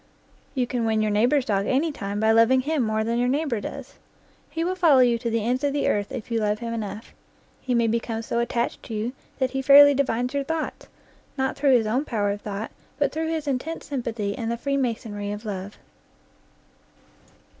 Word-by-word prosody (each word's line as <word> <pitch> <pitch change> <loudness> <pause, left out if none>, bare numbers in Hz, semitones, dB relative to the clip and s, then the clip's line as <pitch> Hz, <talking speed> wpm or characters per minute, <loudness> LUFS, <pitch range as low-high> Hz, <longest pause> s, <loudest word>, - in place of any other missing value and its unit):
You 255 -2 +1
can 245 -1 -2
win 220 -1 +1
your 215 - 0
neighbor's 245 +6 +3
dog 200 -2 0
any 300 +5 +1
time 200 -6 -4
by 220 +1 +3
loving 230 +4 +5
him 300 +2 0
more 220 -1 0
than 230 +2 -1
your 245 - +2
neighbor 270 -4 0
does. - - -8 0.5
He 330 - -2
will 360 +2 0
follow 335 -7 +4
you 240 -2 +3
to 235 - -2
the 225 -1 -1
ends 250 +3 0
of 285 -1 +1
the 285 - 0
earth 205 -1 0
if 235 -1 -6
you 230 - +1
love 210 -1 0
him 230 +1 -5
enough. 215 -1 -6 0.5
He 250 -1 -1
may 235 -1 +3
become 230 0 -1
so 235 - -1
attached 235 0 -1
to 225 - -7
you 220 +4 -2 0.2
that 260 -2 0
he 270 - -2
fairly 285 +1 +8
divines 250 -2 0
your 280 0 0
thoughts, 320 +2 -4 0.5
not 265 0 0
through 275 -1 +3
his 225 - 0
own 240 +6 0
power 205 -6 0
of 205 0 -5
thought, 205 +1 -5 0.3
but 290 - +1
through 320 +1 -2
his 320 -2 -3
intense 280 +5 -3
sympathy 230 -7 -3
and 230 -1 -3
the 235 - -1
free 275 +3 -1
masonry 220 -6 -2
of 210 +2 -6
love. 200 -1 -5
235 Hz, 210 wpm, -24 LUFS, 220-275 Hz, 0.5 s, fairly